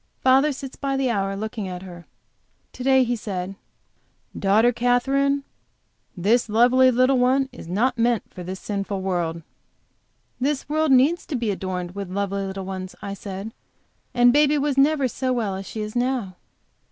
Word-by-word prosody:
Father 270 Hz, +3 st, +4 dB
sits 270 Hz, -1 st, -7 dB
by 275 Hz, -1 st, -2 dB
the 265 Hz, -2 st, +1 dB
hour 195 Hz, -2 st, -1 dB
looking 215 Hz, 0 st, -4 dB
at 180 Hz, 0 st, -6 dB
her. 175 Hz, -2 st, -11 dB, 0.7 s
To 250 Hz, -, -7 dB
day 265 Hz, 0 st, +5 dB
he 245 Hz, 0 st, 0 dB
said: 195 Hz, -4 st, -4 dB, 0.8 s
"Daughter 215 Hz, +5 st, +3 dB
Katherine, 270 Hz, +4 st, +1 dB, 0.7 s
this 220 Hz, +6 st, +2 dB
lovely 250 Hz, +4 st, +5 dB
little 255 Hz, +1 st, +3 dB
one 265 Hz, +2 st, +2 dB
is 245 Hz, -, -11 dB
not 230 Hz, +8 st, 0 dB
meant 235 Hz, -1 st, +2 dB
for 180 Hz, -, -8 dB
this 185 Hz, +2 st, -6 dB
sinful 200 Hz, -1 st, -3 dB
world." 170 Hz, -3 st, -2 dB, 1.0 s
"This 275 Hz, +2 st, -1 dB
world 310 Hz, 0 st, +1 dB
needs 275 Hz, +7 st, +4 dB
to 300 Hz, -, -3 dB
be 230 Hz, -4 st, -1 dB
adorned 185 Hz, -2 st, -4 dB
with 200 Hz, -2 st, -6 dB
lovely 200 Hz, +1 st, -2 dB
little 190 Hz, 0 st, -5 dB
ones," 185 Hz, -1 st, -6 dB
I 200 Hz, -, -4 dB
said. 200 Hz, +2 st, -7 dB, 0.6 s
"And 245 Hz, 0 st, +5 dB
baby 295 Hz, +1 st, +4 dB
was 285 Hz, -1 st, 0 dB
never 280 Hz, 0 st, +3 dB
so 255 Hz, +2 st, -2 dB
well 220 Hz, -5 st, -1 dB
as 195 Hz, 0 st, -7 dB
she 220 Hz, -, -5 dB
is 210 Hz, +1 st, -5 dB
now." 245 Hz, -6 st, -1 dB
235 Hz, 165 wpm, -23 LUFS, 195-265 Hz, 1.0 s, day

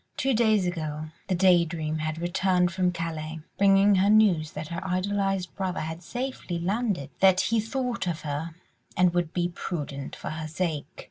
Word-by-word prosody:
Two 270 Hz, 0 st, +1 dB
days 220 Hz, -4 st, +3 dB
ago 155 Hz, -3 st, -3 dB, 0.2 s
the 185 Hz, -, +1 dB
Day 180 Hz, -1 st, +5 dB
Dream 155 Hz, -2 st, -3 dB
had 155 Hz, 0 st, -2 dB
returned 180 Hz, +1 st, +1 dB
from 180 Hz, 0 st, +1 dB
Calais, 160 Hz, -2 st, -4 dB, 0.2 s
bringing 200 Hz, +1 st, +5 dB
her 195 Hz, +1 st, +3 dB
news 200 Hz, -8 st, +4 dB
that 155 Hz, +1 st, -6 dB
her 170 Hz, -, -4 dB
idolised 195 Hz, 0 st, -1 dB
brother 190 Hz, -2 st, -2 dB
had 160 Hz, +2 st, -5 dB
safely 245 Hz, -4 st, -4 dB
landed, 195 Hz, -, -1 dB
that 190 Hz, -1 st, +5 dB
he 230 Hz, 0 st, +1 dB
thought 235 Hz, -1 st, -2 dB
of 165 Hz, -2 st, -2 dB
her, 155 Hz, +2 st, -4 dB, 0.4 s
and 180 Hz, -1 st, +4 dB
would 175 Hz, -2 st, 0 dB
be 175 Hz, -1 st, 0 dB
prudent 145 Hz, -6 st, -5 dB
for -, -, -6 dB
her 155 Hz, 0 st, -5 dB
sake. 160 Hz, -2 st, -2 dB
175 Hz, 175 wpm, -27 LUFS, 160-195 Hz, 0.4 s, Day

